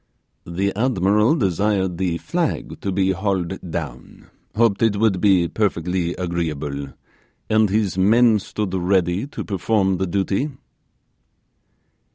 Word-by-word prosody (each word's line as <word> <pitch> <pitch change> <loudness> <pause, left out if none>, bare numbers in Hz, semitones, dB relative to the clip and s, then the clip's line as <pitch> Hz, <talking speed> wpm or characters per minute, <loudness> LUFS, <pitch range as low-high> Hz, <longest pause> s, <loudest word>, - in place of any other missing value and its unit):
'The 95 +3 -1
admiral 105 - +2
desired 95 - 0
the 90 -3 0
flag 170 - -2
to 100 - -2
be 95 0 +1
hauled 95 -1 -2
down 65 -5 -7 0.2
hoped 110 -3 +2
it 115 -3 +3
would 100 -4 +1
be 95 -4 +4
perfectly 90 -3 -1
agreeable 75 -5 -3 0.6
and 110 -1 +4
his 100 -2 0
men 110 +3 +5
stood 100 0 -4
ready 90 +3 +1
to - - -6
perform 95 -1 0
the 95 +1 -1
duty. 100 - 0
95 Hz, 120 wpm, -21 LUFS, 90-105 Hz, 0.6 s, men